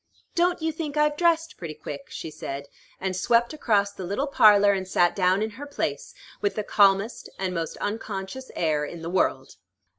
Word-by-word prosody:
"Don't 350 -1 +1
you 320 - +1
think 310 -2 -5
I've 300 0 +3
dressed 330 0 +1
pretty 160 -3 -6
quick?" 150 +2 -8
she 160 - -6
said, 140 -2 -6 0.3
and 190 -1 -2
swept 235 +7 +2
across 205 -9 +1
the 190 - -8
little 200 +10 -1
parlor, 205 -7 +6
and 190 -1 -3
sat 175 -1 +2
down 185 +1 +2
in 220 - -3
her 290 - -6
place, 285 - -3 0.3
with 405 - 0
the 215 - -2
calmest 200 +2 +2
and 190 -1 -2
most 165 -2 -3
unconscious 205 +3 -4
air 155 -3 +1
in 165 +2 -7
the 165 - -4
world. 135 - 0
200 Hz, 185 wpm, -25 LUFS, 180-275 Hz, 0.3 s, parlor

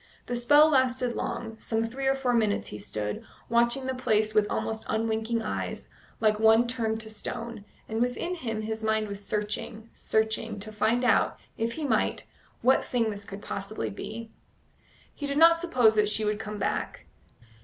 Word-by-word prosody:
The 245 - -3
spell 290 +6 +6
lasted 255 -3 +2
long: 225 -1 -4
some 225 0 -1
three 265 +4 -3
or 270 - +4
four 260 -2 0
minutes 215 -3 +1
he 105 - -7
stood, 105 0 -3 0.3
watching 235 +3 +2
the 260 - -1
place 215 -4 +1
with 210 -1 +3
almost 220 0 -2
unwinking 225 +1 0
eyes, 215 - -4 0.3
like 215 -1 +2
one 225 +2 +5
turned 225 -2 -1
to 220 - -7
stone, 230 0 -5 0.2
and 220 +1 -2
within 250 +9 -1
him 225 -10 -4
his 220 0 -4
mind 220 0 +1
was 200 0 -5
searching, 215 +2 -3
searching, 220 -1 0
to 215 +1 -5
find 220 +4 +1
out, 225 - +3 0.2
if 230 +1 -1
he 320 - -5
might, 285 - +1 0.4
what 260 +2 +4
thing 230 -3 0
this 205 -1 -7
could 200 0 -9
possibly 200 +3 -4
be. 225 +2 -7 0.8
He 285 - -5
did 280 0 -2
not 335 +1 +7
suppose 250 -11 +4
that 210 -1 +4
she 215 0 +1
would 210 0 0
come 210 -1 -5
back. - - -2
225 Hz, 175 wpm, -28 LUFS, 215-245 Hz, 0.8 s, not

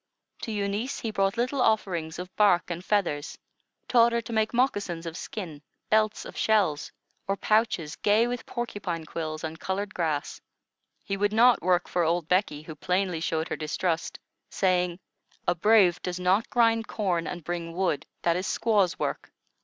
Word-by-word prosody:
To 225 - -4
Eunice 205 +4 -2
he 225 - -2
brought 195 -1 0
little 255 +3 0
offerings 175 -8 0
of 180 +1 -8
bark 200 -4 +3
and 170 +1 -4
feathers; 175 -8 -1 0.5
taught 235 -1 +5
her 235 - +1
to 230 - -7
make 220 0 +1
moccasins 205 -9 0
of 165 -1 -5
skin, 170 -7 -6 0.3
belts 215 0 +2
of - - -9
shells, 195 -9 +1 0.4
or 195 0 0
pouches 210 -9 +1
gay 210 +3 +3
with 245 0 -4
porcupine 200 -9 -4
quills 155 0 -5
and 160 0 -5
colored 200 +2 -3
grass. 155 -4 -2 0.6
He 195 - -3
would 205 +1 +1
not 240 +2 +5
work 180 0 +2
for 180 - 0
old 170 0 +1
Becky, 180 -5 +1
who 160 - -8
plainly 180 +1 -1
showed 160 0 -1
her - - -1
distrust, 165 +2 -2 0.3
saying: 180 -2 +1 0.5
"A - - +4
brave 185 -1 +4
does 180 0 -4
not 185 +5 +2
grind 230 -2 +3
corn 180 -6 -1
and 175 -2 -5
bring 170 0 -4
wood; 180 -6 0 0.2
that 170 -1 +3
is 185 +2 -2
squaw's 205 -7 +2
work. - - -3
185 Hz, 170 wpm, -27 LUFS, 170-215 Hz, 0.6 s, taught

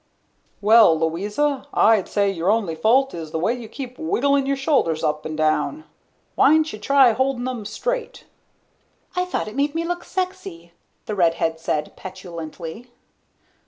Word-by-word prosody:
"Well, 210 -5 +6
Louisa, 210 - -1
I'd 215 -4 +4
say 200 -1 +1
your 175 0 -1
only 210 -6 +1
fault 245 +11 +2
is 160 -2 -6
the 160 - -3
way 180 +8 +1
you 240 -3 -8
keep 255 -2 -8
wigglin' 280 -3 +1
your 275 - +1
shoulders 270 - +1
up 150 0 -1
'n' 155 - -5
down. 155 - 0 0.5
Why'n'sha 310 -7 +3
try 270 +2 +5
holdin' 255 +1 -1
'em 245 -5 -5
straight?" - - -4 0.9
"I 360 0 +1
thought 360 - -3
it 215 - -8
made 285 +2 0
me 335 0 -1
look 350 +1 -3
sexy," 365 - -5 0.3
the 215 - -4
redhead 165 -3 +1
said 150 -2 -2
petulantly. 180 +3 -8
220 Hz, 150 wpm, -22 LUFS, 170-280 Hz, 0.9 s, Well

